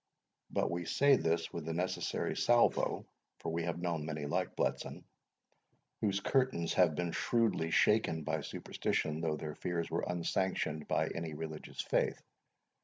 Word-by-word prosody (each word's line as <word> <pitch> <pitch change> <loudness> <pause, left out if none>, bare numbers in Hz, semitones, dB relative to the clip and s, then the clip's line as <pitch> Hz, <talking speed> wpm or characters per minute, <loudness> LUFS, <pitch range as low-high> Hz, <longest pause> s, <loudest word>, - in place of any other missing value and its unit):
But - - 0
we 85 0 -2
say 140 +7 +5
this 85 -6 0
with 85 -2 -4
the 80 - -2
necessary 90 +2 -1
salvo; 120 0 +3 0.3
for - - -4
we 85 - 0
have 85 -1 -2
known 85 -3 -1
many 75 -1 -3
like 75 - -1
Bletson, - - -2 1.0
whose 100 -2 +1
curtains 125 -7 +1
have 85 -4 +4
been 85 +1 -1
shrewdly 115 -8 +1
shaken 85 -3 +3
by 80 0 -1
superstition, 75 +2 -2
though 80 -2 0
their 75 -1 -5
fears 85 +1 -3
were - - 0
unsanctioned 85 -3 -1
by - - +1
any 80 -2 -4
religious 80 0 -5
faith. - - +1
85 Hz, 150 wpm, -34 LUFS, 80-95 Hz, 1.0 s, say